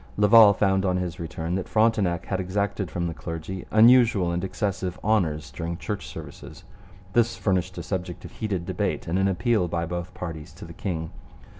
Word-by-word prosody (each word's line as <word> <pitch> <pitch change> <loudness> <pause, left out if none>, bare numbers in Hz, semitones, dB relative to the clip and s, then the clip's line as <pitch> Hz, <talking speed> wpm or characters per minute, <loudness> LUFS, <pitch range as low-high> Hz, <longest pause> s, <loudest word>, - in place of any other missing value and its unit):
Laval 105 +1 +8
found 95 -1 +2
on 90 -1 +1
his 90 0 -4
return 80 0 -4
that 95 0 -2
Frontenac 105 -6 +2
had 95 - -2
exacted 100 0 -2
from 85 -1 -3
the 85 - -2
clergy 85 +3 -6
unusual 115 -5 +5
and 85 +1 -2
excessive 95 -1 -3
honours 80 -10 0
during 85 +4 -4
church 95 +3 -5
services. - - -10 0.5
This 115 -1 +2
furnished 95 -4 -1
a - - -4
subject 90 -2 -4
of - - -9
heated 100 -6 -3
debate - - -2
and 85 +3 0
an 95 - +3
appeal 105 0 +1
by 85 0 -2
both 85 +2 -5
parties 80 -3 -7
to 85 - -11
the 85 - -10
king. 80 -3 -4
90 Hz, 180 wpm, -25 LUFS, 85-100 Hz, 0.5 s, Laval